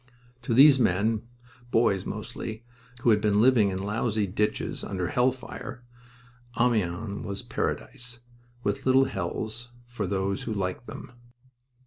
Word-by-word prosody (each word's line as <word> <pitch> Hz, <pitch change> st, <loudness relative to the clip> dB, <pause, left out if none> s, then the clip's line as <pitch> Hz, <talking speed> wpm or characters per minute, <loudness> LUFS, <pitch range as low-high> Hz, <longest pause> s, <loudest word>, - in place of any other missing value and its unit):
To 120 Hz, -2 st, -1 dB
these 135 Hz, +1 st, +8 dB
men 110 Hz, +2 st, +1 dB, 0.4 s
boys, 110 Hz, -5 st, +2 dB
mostly 110 Hz, +2 st, -6 dB, 0.4 s
who 120 Hz, -, +4 dB
had 105 Hz, -1 st, +3 dB
been 105 Hz, -1 st, +3 dB
living 115 Hz, -3 st, +5 dB
in 95 Hz, -, -2 dB
lousy 105 Hz, +2 st, 0 dB
ditches 105 Hz, +3 st, -1 dB
under 90 Hz, -3 st, -2 dB
hell 125 Hz, +5 st, +3 dB
fire, 125 Hz, 0 st, -8 dB, 0.8 s
Amiens 105 Hz, -4 st, 0 dB
was 100 Hz, 0 st, -5 dB
Paradise, 120 Hz, -1 st, -4 dB, 0.4 s
with 100 Hz, +5 st, -1 dB
little 130 Hz, +1 st, +6 dB
hells 120 Hz, -2 st, -3 dB, 0.2 s
for 120 Hz, -5 st, -4 dB
those 95 Hz, +1 st, -1 dB
who 115 Hz, -, -2 dB
liked 95 Hz, +4 st, -3 dB
them. -, -, -8 dB
110 Hz, 130 wpm, -27 LUFS, 100-120 Hz, 0.8 s, these